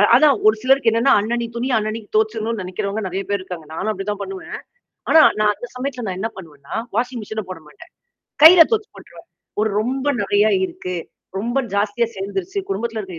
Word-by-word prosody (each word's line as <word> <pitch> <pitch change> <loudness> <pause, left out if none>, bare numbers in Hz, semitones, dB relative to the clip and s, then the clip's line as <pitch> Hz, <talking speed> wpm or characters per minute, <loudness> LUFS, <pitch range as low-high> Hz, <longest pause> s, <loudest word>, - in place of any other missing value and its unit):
அதான் 285 +1 +5
ஒரு 215 - +5
சிலருக்கு 265 -2 +3
என்னன்னா 230 +4 +3
அன்னனைக்கு 230 +2 -3
துணிய 245 +2 -1
அன்னனைக்கு 215 0 -3
துவைச்சுரணும் 220 0 0
நினைக்கிறவங்க 200 +4 -3
நெறைய 190 +2 -3
பேர் 200 -1 0
இருக்காங்க. 180 -4 -8
நானும் 215 +6 -3
அப்படிதான் 205 0 -4
பண்ணுவேன். 195 -1 -7 0.5
ஆனா, 320 - +7 0.2
நான் 210 0 +4
அந்த 245 - -8
சமயத்தல 250 -1 -4
நான் 185 -1 -4
என்ன 225 +3 -2
பண்ணுவேன்னா, 155 -6 -10 0.2
வாஷிங் 245 +1 -1
மெஷின 215 +1 -5
போட 185 -3 -7
மாட்டேன். 150 - -16 0.5
கையில 330 +1 +11
துவச்சு 435 -1 0
போட்டுருவேன். - - -15 0.3
ஒரு 215 0 +1
ரொம்ப 260 +5 -2 0.2
நறையா 205 +2 +3
இருக்கு. 185 -1 -5 0.4
ரொம்ப 240 +6 0
ஜாஸ்தியா 210 +3 +1
சேர்ந்துருச்சு. 355 - -3
குடும்பத்தில 230 - -2
இருக்கிற 185 -5 -8
220 Hz, 175 wpm, -20 LUFS, 195-245 Hz, 0.5 s, கையில